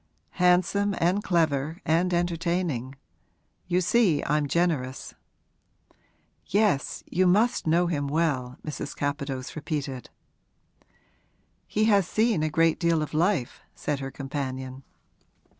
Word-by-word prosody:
'Handsome 185 Hz, +3 st, +2 dB
and 185 Hz, +5 st, +1 dB
clever 160 Hz, -2 st, 0 dB
and 170 Hz, +3 st, +2 dB
entertaining. 170 Hz, -6 st, -1 dB, 0.7 s
You 180 Hz, 0 st, +2 dB
see 180 Hz, -5 st, +3 dB
I'm 150 Hz, -1 st, +1 dB
generous.' 145 Hz, -6 st, -1 dB, 1.3 s
'Yes; 200 Hz, -9 st, +1 dB
you 185 Hz, +2 st, +2 dB
must 215 Hz, +2 st, +2 dB
know 170 Hz, +3 st, +3 dB
him 145 Hz, -5 st, -1 dB
well,' 140 Hz, -4 st, -1 dB
Mrs. 150 Hz, -1 st, -5 dB
Capadose 140 Hz, -2 st, -3 dB
repeated. 145 Hz, -5 st, -4 dB, 1.6 s
'He 215 Hz, +1 st, +1 dB
has 200 Hz, -5 st, +4 dB
seen 215 Hz, -5 st, +1 dB
a 155 Hz, -, +1 dB
great 165 Hz, +1 st, +2 dB
deal 170 Hz, -3 st, +2 dB
of 155 Hz, -, -7 dB
life,' 165 Hz, -5 st, 0 dB
said 145 Hz, -2 st, -2 dB
her 135 Hz, -1 st, -4 dB
companion. 130 Hz, -1 st, -5 dB
160 Hz, 110 wpm, -26 LUFS, 140-180 Hz, 1.6 s, has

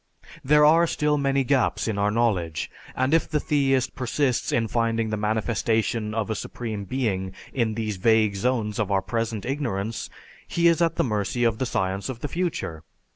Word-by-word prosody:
There 150 Hz, +2 st, +5 dB
are 165 Hz, +3 st, +5 dB
still 150 Hz, -2 st, +1 dB
many 135 Hz, -1 st, +2 dB
gaps 130 Hz, -3 st, +1 dB
in 105 Hz, -2 st, -1 dB
our 100 Hz, +1 st, +2 dB
knowledge, 105 Hz, -8 st, 0 dB, 0.2 s
and 130 Hz, +3 st, +1 dB
if 165 Hz, -, +2 dB
the 150 Hz, -, +1 dB
theist 135 Hz, -4 st, +1 dB
persists 130 Hz, +1 st, 0 dB
in 115 Hz, -1 st, +1 dB
finding 115 Hz, 0 st, 0 dB
the -, -, 0 dB
manifestation 110 Hz, +1 st, 0 dB
of 110 Hz, -1 st, -1 dB
a -, -, -1 dB
supreme 110 Hz, -4 st, -5 dB
being 95 Hz, -6 st, -2 dB, 0.2 s
in 115 Hz, -4 st, 0 dB
these 110 Hz, -3 st, -2 dB
vague 110 Hz, +1 st, +3 dB
zones 110 Hz, -1 st, -1 dB
of 105 Hz, -2 st, 0 dB
our 95 Hz, -1 st, +2 dB
present 115 Hz, -3 st, -2 dB
ignorance, 115 Hz, -6 st, -3 dB, 0.4 s
he 170 Hz, 0 st, +2 dB
is 170 Hz, 0 st, +3 dB
at 165 Hz, -1 st, +2 dB
the -, -, +2 dB
mercy 105 Hz, 0 st, -1 dB
of 115 Hz, -2 st, +1 dB
the 130 Hz, -, 0 dB
science 95 Hz, +1 st, -2 dB
of 120 Hz, -2 st, -6 dB
the -, -, -2 dB
future. 165 Hz, -, -3 dB
115 Hz, 180 wpm, -25 LUFS, 105-135 Hz, 0.4 s, There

